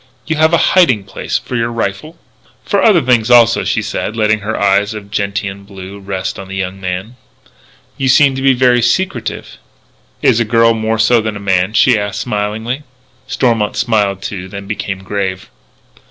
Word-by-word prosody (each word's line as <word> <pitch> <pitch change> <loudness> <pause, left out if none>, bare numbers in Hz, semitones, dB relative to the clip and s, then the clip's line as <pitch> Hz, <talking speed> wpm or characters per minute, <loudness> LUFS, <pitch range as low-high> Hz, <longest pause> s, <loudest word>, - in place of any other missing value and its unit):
"You 160 - -1
have 160 +1 +3
a 170 - +4 0.2
hiding 130 - +4
place 95 - -3
for 125 - -7
your 115 0 -1
rifle?" 115 - -4 0.5
"For 200 - +1
other 185 -8 +4
things, 120 -2 +2
also," 115 -1 +5
she - - -1
said, 110 - -4
letting 110 0 +2
her 105 +2 -4
eyes 100 +2 +2
of 100 -1 -9
gentian 100 -1 -3
blue 100 0 -10
rest 95 -1 -4
on 95 - -8
the 95 - -7
young 95 0 -4
man. 95 +6 -5 0.8
"You 135 - -1
seem 135 +1 +5
to 135 - -4
be 135 0 +4
very 125 -1 +3
secretive." 185 +11 -2 0.6
"Is 110 - +4
a - - +3
girl 115 +1 +3
more 110 0 -1
so 115 +1 +3
than 110 -1 -3
a - - -6
man?" 95 0 0
she 125 -1 +4
asked 100 -1 -3
smilingly. 110 +4 -3 0.5
Stormont 120 -5 0
smiled 105 -5 0
too, 95 -2 -5
then 100 +1 -8
became 100 -2 -5
grave. 95 -4 -4
110 Hz, 180 wpm, -15 LUFS, 100-120 Hz, 0.8 s, also